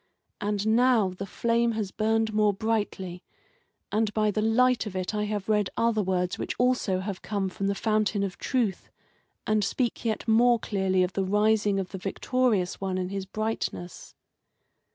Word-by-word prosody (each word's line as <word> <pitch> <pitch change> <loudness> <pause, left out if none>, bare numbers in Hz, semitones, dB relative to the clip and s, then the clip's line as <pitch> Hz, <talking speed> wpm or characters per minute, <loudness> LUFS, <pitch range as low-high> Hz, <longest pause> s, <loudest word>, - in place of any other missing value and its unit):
And 205 0 -1
now 225 -2 +4
the 185 +2 -7
flame 235 +3 +1
has 215 -3 -3
burned 220 0 0
more 210 -1 +3
brightly, 205 -4 -2 0.7
and 215 0 +1
by 215 -1 +2
the 215 - -1
light 230 +1 +3
of 195 - -7
it 185 +2 -2
I 210 0 0
have 205 -2 -3
read 210 -3 +2
other 230 -2 +2
words 180 -2 -1
which - - -3
also 245 -7 +1
have 195 -1 -5
come 200 -3 -2
from 195 +2 -3
the 200 - 0
fountain 215 -1 +1
of 195 -2 -4
Truth, 230 -8 -1 0.6
and 215 -1 +2
speak 240 +4 -1
yet 225 0 -2
more 235 +2 +5
clearly 190 -4 0
of 180 0 -2
the 195 - 0
rising 210 +1 +2
of 185 -2 -4
the 190 - -7
Victorious 205 -1 0
One 190 -1 -1
in 185 -1 -2
his 195 -1 -4
brightness." 215 -4 -4
210 Hz, 175 wpm, -27 LUFS, 190-225 Hz, 0.7 s, more